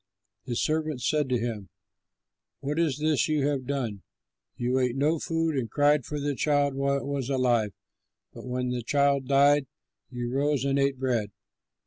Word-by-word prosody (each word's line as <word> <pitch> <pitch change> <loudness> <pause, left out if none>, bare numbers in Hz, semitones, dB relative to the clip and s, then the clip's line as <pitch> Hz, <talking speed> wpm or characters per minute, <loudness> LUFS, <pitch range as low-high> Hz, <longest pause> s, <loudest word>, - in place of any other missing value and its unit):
His 120 -3 -1
servants 155 -5 -1
said 150 -3 +1
to 125 - +2
him, 115 -4 -4 0.9
"What 145 +3 -2
is 160 -5 +1
this 150 -4 +1
you 150 -3 +1
have 140 -3 -1
done? 120 -8 -2 0.6
You 125 +2 0
ate 125 -1 0
no 150 +4 +1
food 165 -1 -1
and 125 -4 -2
cried 145 -2 +3
for 150 -1 -4
the 145 0 -1
child 145 +1 +1
while 140 +1 +1
it - - -5
was 140 -2 -3
alive, 120 -5 +2 0.6
but - - -10
when 125 0 -2
the 125 -1 -2
child 140 +1 +1
died, 140 +1 +4 0.4
you 120 -1 -4
rose 140 0 +1
and 140 0 +1
ate 140 -1 +1
bread." 120 -5 0
140 Hz, 170 wpm, -27 LUFS, 125-145 Hz, 0.9 s, died